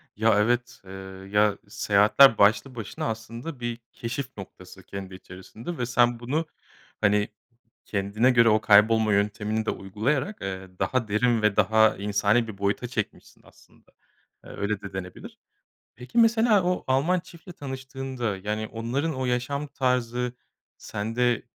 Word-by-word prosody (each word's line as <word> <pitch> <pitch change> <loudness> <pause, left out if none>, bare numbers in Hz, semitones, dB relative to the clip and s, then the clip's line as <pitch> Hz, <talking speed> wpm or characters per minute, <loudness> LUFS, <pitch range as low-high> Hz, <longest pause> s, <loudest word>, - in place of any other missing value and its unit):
Ya, 110 +1 +3
evet. 120 +3 0
Eee, 95 - -11 0.4
ya, 105 0 +3
seyahatler 105 +5 +5
başlı 110 +6 +3
başına 110 -4 -5
aslında 115 +6 -6
bir 120 -1 -4
keşif 120 +1 -5
noktası 95 -1 -11
kendi 95 0 -8
içerisinde 95 - -9
ve 120 - -1
sen 120 0 +2
bunu, 140 +7 -1 0.6
hani, 105 0 +3 0.6
kendine 105 +5 +1
göre 115 -2 +5
o 110 0 +3
kaybolma 110 +1 +5
yöntemini 105 +2 0
de - - +1
uygulayarak, 125 - -2
eee, 95 -1 -5
daha 130 -3 0
derin 115 +2 +2
ve 105 -2 +2
daha 110 -1 +4
insani 105 +3 +1
bir 105 - -8
boyuta 100 +5 -1
çekmişsin 115 -4 -5
aslında. - - -23 0.5
Eee, - - -12
öyle 100 0 -3
de 100 - -9
denebilir. 90 -1 -8 0.6
Peki, 125 - -5
mesela 225 -3 +4
o 180 0 -1
Alman 145 +8 +2
çiftle 170 +1 -13
tanıştığında, 130 - -5
yani, 105 +3 -3
onların 125 +9 -2
o 130 0 -2
yaşam 125 +4 -1
tarzı 125 -2 -1 0.5
sende 115 +3 -1
115 Hz, 140 wpm, -26 LUFS, 105-130 Hz, 0.6 s, seyahatler